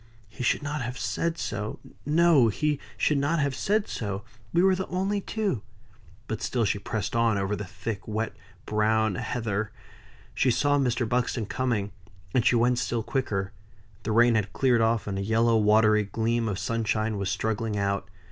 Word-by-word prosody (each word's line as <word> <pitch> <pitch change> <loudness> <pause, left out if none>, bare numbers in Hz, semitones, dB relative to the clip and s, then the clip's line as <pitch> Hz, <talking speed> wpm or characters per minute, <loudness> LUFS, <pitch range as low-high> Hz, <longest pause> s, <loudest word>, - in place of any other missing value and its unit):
"He 110 +3 -10
should 125 - +1
not 145 0 -3
have 125 +1 -4
said 170 0 -1
so. 105 -6 -3 0.3
No! 155 -5 +5
he 150 +7 0 0.2
should 150 -2 +2
not 145 +4 +1
have 140 -2 +1
said 210 +8 0
so. 100 -2 -4 0.3
We 175 - +3
were 190 0 +5
the 190 +1 -3
only 195 +3 -1
two." 200 - -2 0.7
But - - -4
still 120 -2 0
she 100 0 0
pressed 100 0 -3
on, 115 -2 +3
over 100 +1 0
the 105 - -5
thick, 100 +2 -6
wet, 110 +1 -2 0.3
brown 110 0 +2
heather. 110 +1 -2 0.6
She 130 - +2
saw 145 +4 +2
Mr. 125 -3 +1
Buxton 120 -1 0
coming; 105 -3 -1 0.4
and 125 - +3
she 120 - +4
went 120 +1 +3
still 120 -2 -1
quicker. 100 -7 -2 0.5
The 110 - -3
rain 120 +2 +5
had 105 -2 0
cleared 125 -4 +3
off, 115 -2 +2
and 95 -1 -3
a - - -2
yellow 115 +2 +3
watery 105 0 +4
gleam 115 +2 0
of 100 - -2
sunshine 110 0 -1
was 100 -1 -1
struggling 110 0 -1
out. 100 -1 -1
115 Hz, 175 wpm, -27 LUFS, 105-130 Hz, 0.7 s, No